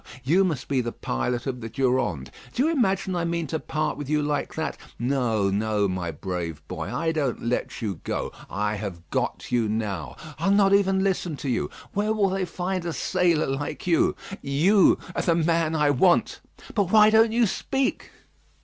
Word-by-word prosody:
You 170 +9 +4
must 165 -8 -2
be 135 -2 +1
the 120 -1 -3
pilot 120 - -2
of 125 -2 -3
the 115 - -5
Durande. 125 - 0 0.2
Do 255 - +2
you 320 - +2
imagine 195 - +1
I 175 - 0
mean 170 -1 -1
to 160 +2 -3
part 155 0 -2
with 145 -2 -6
you 150 0 +2
like 145 0 -2
that? - - -2 0.2
No, 120 -6 +1
no, 105 0 +1
my 90 -2 -3
brave 80 -2 -5
boy; - - -5
I 165 0 0
don't 145 -6 -1
let 120 0 -2
you 100 -7 -3
go. - - -3 0.2
I 105 +1 -1
have 90 -5 -6
got - - -2
you 120 -3 +2
now; 100 - -3 0.2
I'll - - +1
not 200 0 +4
even 195 -1 +3
listen 180 -5 -1
to 135 - -4
you. 120 - 0 0.2
Where 210 +2 +1
will 205 -3 +2
they 190 0 -1
find 180 +1 -3
a 170 -1 -3
sailor 175 -3 +1
like 135 +2 -4
you? 170 -2 +3 0.3
You 165 +9 +4 0.2
are - - 0
the 170 - +2
man 165 -1 +1
I 150 -2 +3
want. 180 - +3 0.3
But 200 -4 +1
why 215 0 +7
don't 220 +1 +5
you 235 +1 +3
speak?" 270 +6 -1
150 Hz, 190 wpm, -25 LUFS, 115-190 Hz, 0.3 s, why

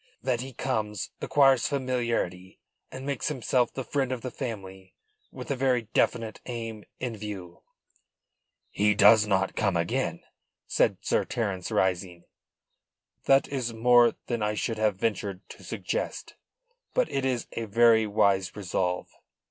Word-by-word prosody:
That 125 -2 0
he 135 +1 -7
comes, 110 -5 -3
acquires 135 -4 +4
familiarity 120 -9 -2 0.3
and 130 +1 -7
makes 140 -3 -2
himself 125 -3 +1
the 130 - -5
friend 135 +1 -1
of 130 -2 -3
the 125 - -5
family 95 -6 -7 0.4
with - - -7
a - - +1
very 130 -2 +1
definite 115 -2 0
aim 115 -3 -5
in 125 -3 -3
view." 100 -5 -8 1.1
"He 105 +1 +2
does 105 +2 +7
not 95 -1 +1
come 100 -5 +1
again," 85 0 -1 0.4
said - - +2
Sir - - +1
Terence, 100 -6 -3
rising. 90 -2 0 1.0
"That 135 0 +4
is 125 -4 -3
more 120 +1 +5
than 120 -2 -2
I 105 0 0
should 110 +1 -2
have 110 -2 +2
ventured 100 -2 -3
to - - -12
suggest. - - -4 0.6
But - - +3
it 135 - -1
is 130 -3 0
a 115 - -4
very 110 +1 +4
wise 100 -3 +2
resolve. 90 -2 -2
115 Hz, 140 wpm, -27 LUFS, 100-125 Hz, 1.1 s, does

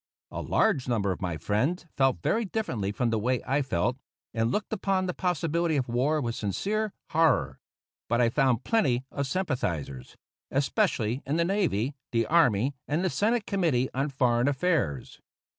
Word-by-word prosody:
A - - -4
large 130 - +1
number 105 -5 +1
of 90 - -5
my 90 -4 -2
friends 135 - -1
felt 135 -11 +2
very 230 - +1
differently 125 - -2
from 115 +2 0
the 110 - +1
way 125 +3 +1
I 140 +2 +1
felt, 125 0 0 0.4
and 115 0 +1
looked 210 +6 -2
upon 195 -2 0
the 180 - -2
possibility 170 -2 0
of 130 - -1
war 130 +6 +1
with 120 -5 -2
sincere 205 - -1 0.2
horror. 155 - +2 0.5
But 120 +1 +2
I 120 -1 +4
found 130 -2 +2
plenty 135 - +1
of 140 -1 -2
sympathizers, 90 - -3 0.3
especially 135 - 0
in 145 +3 0
the 170 - +2
navy, 170 - 0 0.2
the 115 -1 +1
army, 135 -6 +3
and 160 +6 0
the 185 - +1
Senate 225 +2 +1
Committee 160 - +1
on 135 +3 0
Foreign 125 -2 +2
Affairs. 145 - -1
135 Hz, 165 wpm, -28 LUFS, 115-170 Hz, 0.5 s, I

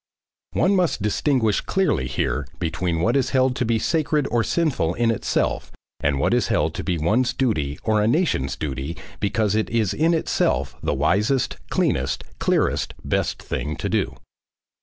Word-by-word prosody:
One 195 +2 +3
must 180 - +1
distinguish 110 0 +1
clearly 185 - 0
here 65 +2 -1
between 85 0 -1
what 115 +8 +2
is 130 -2 +2
held 130 0 +3
to 125 - 0
be 115 0 +2
sacred 150 +3 +1
or 120 -1 +2
sinful 135 - 0
in 115 -1 +2
itself 115 - -1 0.3
and 70 -1 +1
what - - +2
is - - +2
held 75 +2 +1
to - - -4
be 90 -3 -1
one's 115 +11 +1
duty 75 - 0
or 110 -1 +2
a 105 - +2
nation's 115 - +1
duty 70 +3 -4 0.2
because 105 0 +1
it 110 0 0
is 110 -4 +1
in 165 +2 +2
itself 65 - 0
the - - -1
wisest, 110 +7 +1
cleanest, 65 +1 0 0.2
clearest, - - +1
best - - -1
thing 75 +2 -3
to - - -3
do. - - 0
105 Hz, 165 wpm, -23 LUFS, 80-130 Hz, 0.3 s, One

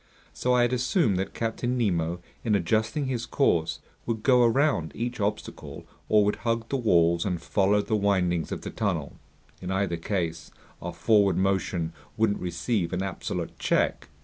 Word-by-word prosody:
So 125 0 +1
I 125 - +4
had 120 +1 +1
assumed 120 - +2
that 95 - -4
Captain 120 +2 -1
Nemo, 85 -6 0 0.2
in 110 -3 +2
adjusting 110 - 0
his 120 -3 -3
course, 85 - +1 0.3
would 110 -2 -2
go 125 -2 +5
around 120 - +2
each 120 +2 -3
obstacle 105 0 -4 0.2
or 105 -1 +5
would 105 - 0
hug 115 -1 -1
the - - -1
walls 85 -7 +3
and 90 -4 -1
follow 100 +3 +2
the 110 - 0
windings 90 -5 +1
of - - -4
the - - -6
tunnel. - - -2 0.5
In 90 - -5
either 95 -2 0
case 85 -4 -3 0.3
our - - -4
forward 100 -4 +3
motion 95 -3 0 0.2
wouldn't 110 -2 +2
receive 90 +1 -1
an 90 +1 -1
absolute 90 -2 -4
check. - - 0
100 Hz, 165 wpm, -27 LUFS, 90-115 Hz, 0.5 s, go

